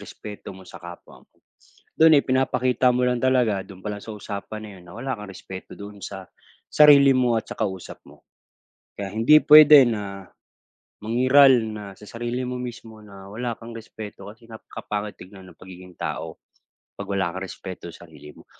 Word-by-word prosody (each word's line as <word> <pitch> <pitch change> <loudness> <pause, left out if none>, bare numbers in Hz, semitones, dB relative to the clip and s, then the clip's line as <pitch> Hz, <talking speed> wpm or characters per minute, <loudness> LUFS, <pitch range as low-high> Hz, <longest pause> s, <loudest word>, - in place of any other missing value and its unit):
respeto 105 -1 -10
mo 95 - -14
sa - - -12
kapwa 85 0 -12
mo. - - -52 0.7
Do'n 160 -1 +6
ipinapakita 130 -2 +1
mo 125 - +1
lang 125 -1 0
talaga, 125 -6 +1
do'n 95 -2 -13
pa 105 - -3
lang 105 - -7
sa 110 - -8
usapan 105 +1 -7
na 105 - -9
'yon, - - -18
na - - -12
wala 130 +2 -4
kang 105 -1 -9
respeto 95 0 -10
doon 100 0 -10
sa, 95 -1 -8 0.5
sarili 140 -2 +7
mo 125 -2 +2
at - - -6
sa - - -6
kausap 95 -5 -5
mo. - - -19 0.7
Kaya 100 -1 -5
hindi 125 +8 +5
puwede 150 -1 +9
na, 100 -4 -5 0.7
mangiral 130 +5 +5 0.2
na, 105 -1 -8
sa 105 - -15
sarili 120 +3 -4
mo 125 - -4
mismo 115 -3 -9
na, 100 -2 -13
wala 120 +4 -4
kang 115 0 -10
respeto, 110 -2 -10
kasi 115 +1 -20
nga, 110 - -9 0.2
kapangit 105 0 -5
tignan 95 0 -13
ng 80 - -23
pagiging 90 0 -13
tao, - - -5 0.6
'pag 100 -1 -7
wala 95 -3 -1
kang 95 - -5
respeto 95 -2 -9
sarili 80 -3 -14
mo. - - -17
110 Hz, 180 wpm, -23 LUFS, 95-125 Hz, 0.7 s, puwede